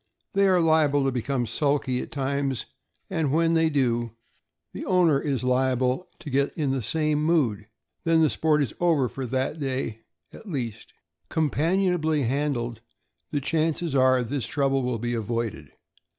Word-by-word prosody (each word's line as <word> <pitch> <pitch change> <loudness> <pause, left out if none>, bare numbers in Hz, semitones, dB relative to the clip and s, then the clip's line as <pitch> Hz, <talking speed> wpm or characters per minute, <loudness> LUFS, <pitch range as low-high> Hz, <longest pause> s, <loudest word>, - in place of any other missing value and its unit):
They 200 0 +4
are 185 -1 +4
liable 155 -4 +3
to 135 - +1
become 125 0 -1
sulky 130 +1 0
at - - -8
times, 140 -3 -1 0.4
and 160 -7 -1
when 165 +2 +2
they 165 -1 +3
do, 120 -5 0 0.6
the - - -6
owner 175 -6 +3
is 140 -3 -2
liable 130 +3 +1
to 165 -4 -8
get 140 +2 0
in 145 -4 0
the 135 -1 -1
same 150 +4 0
mood; 125 -11 +1 0.4
then 165 -1 +3
the 155 - +4
sport 150 -2 +2
is 125 - -4
over, 160 -7 +3
for 130 +1 -5
that 130 +5 -2
day, 130 -5 -3 0.3
at 215 - -11
least. 120 - -5 0.4
Companionably 160 0 +1
handled, 125 -3 -1 0.5
the 145 - -1
chances 160 +2 0
are 130 -1 +4
this 130 +1 -3
trouble 135 -1 +1
will 125 -2 -1
be 120 +2 -3
avoided. 115 - -3
140 Hz, 155 wpm, -25 LUFS, 125-160 Hz, 0.6 s, They